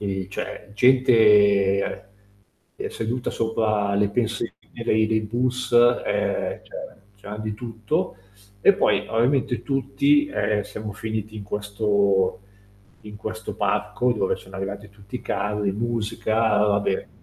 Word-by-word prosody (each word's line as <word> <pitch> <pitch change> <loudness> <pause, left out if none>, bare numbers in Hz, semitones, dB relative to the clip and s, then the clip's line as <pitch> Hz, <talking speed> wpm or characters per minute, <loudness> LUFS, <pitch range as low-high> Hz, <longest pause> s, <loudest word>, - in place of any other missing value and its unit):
E 95 -2 -3
cioè 100 +1 -6
gente, 105 -6 +4 0.7
ehm, - - -4
seduta 120 +3 -3
sopra 110 -3 0
le 100 0 +2
pensiline 115 +1 -1 0.3
dei 110 -1 +3
dei 110 0 +1
bus. 125 +3 -2
Ehm, 120 0 +2 0.6
cioè 100 0 -11
c'era 105 - -5
di 110 -1 -3
tutto 110 -3 -3 0.4
e - - +6
poi - - +2
ovviamente 125 +2 +1
tutti, 285 - +2
ehm, 105 - 0
siamo 105 +1 -7
finiti 110 +1 -5
in 105 - -6
questo 100 -2 +1 0.6
in 105 -1 -10
questo 110 0 -6
parco 105 +4 0
dove 100 -5 0
sono 95 +1 -12
arrivati 100 +2 -5
tutti 100 +3 -9
i - - -8
carri, 105 0 -1
musica, 110 0 -2 0.2
vabbè. 100 -2 +1
105 Hz, 125 wpm, -24 LUFS, 100-115 Hz, 0.7 s, e